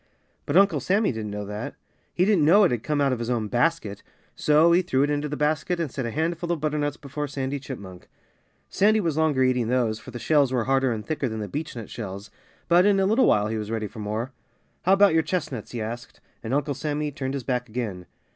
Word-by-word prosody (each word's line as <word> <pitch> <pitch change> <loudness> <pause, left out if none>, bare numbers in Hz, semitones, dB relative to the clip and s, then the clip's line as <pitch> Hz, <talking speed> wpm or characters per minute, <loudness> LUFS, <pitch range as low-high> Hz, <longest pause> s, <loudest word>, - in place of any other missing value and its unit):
But - - +2
Uncle 200 0 +5
Sammy 200 +3 +1
didn't 110 -3 -5
know 105 0 -5
that. 105 +1 -6 0.4
He 180 - +2
didn't 200 -6 +3
know 190 +8 +6
it 185 - +4
had 120 -3 -1
come 150 +3 -1
out 140 -2 +2
of 125 - -3
his 120 0 -3
own 115 -3 0
basket. 120 -6 0 0.3
So 155 +3 +4
he 175 +2 +5
threw 135 -7 +1
it 145 - +1
into 145 0 -1
the 150 - -4
basket 150 +3 0
and 160 -6 -2
set 130 -4 -3
a - - -2
handful 170 +5 -2
of 170 - -1
butternuts 150 -1 -1
before 145 +1 -5
Sandy 135 0 -3
Chipmunk. 100 -8 -9 0.6
Sandy 215 +2 +3
was 165 -7 -1
longer 155 -4 +2
eating 125 -3 +1
those, 115 -3 0
for 110 - -12
the 125 - -7
shells 145 0 +2
were 125 -3 +1
harder 135 +1 +2
and 110 -2 -4
thicker 150 -3 -2
than 110 0 -5
the 105 - -4
beechnut 120 - -6
shells. 100 -2 -7 0.4
But 175 +3 +5
in 200 -1 +4
a 190 - +3
little 220 +6 +3
while 105 0 +3
he 110 0 -2
was 105 -1 -5
ready 110 -1 -2
for 110 +2 -9
more. 110 +5 -3 0.5
"How 190 - +5
about 195 -2 +5
your 160 - +4
chestnuts?" 150 - -3
he 120 - -5
asked. 120 +2 -7 0.2
And 115 - -5
Uncle 145 +1 0
Sammy 150 +2 -2
turned 135 0 -4
his 135 - -4
back 125 -1 -2
again. 105 -6 -4
135 Hz, 235 wpm, -25 LUFS, 115-160 Hz, 0.6 s, know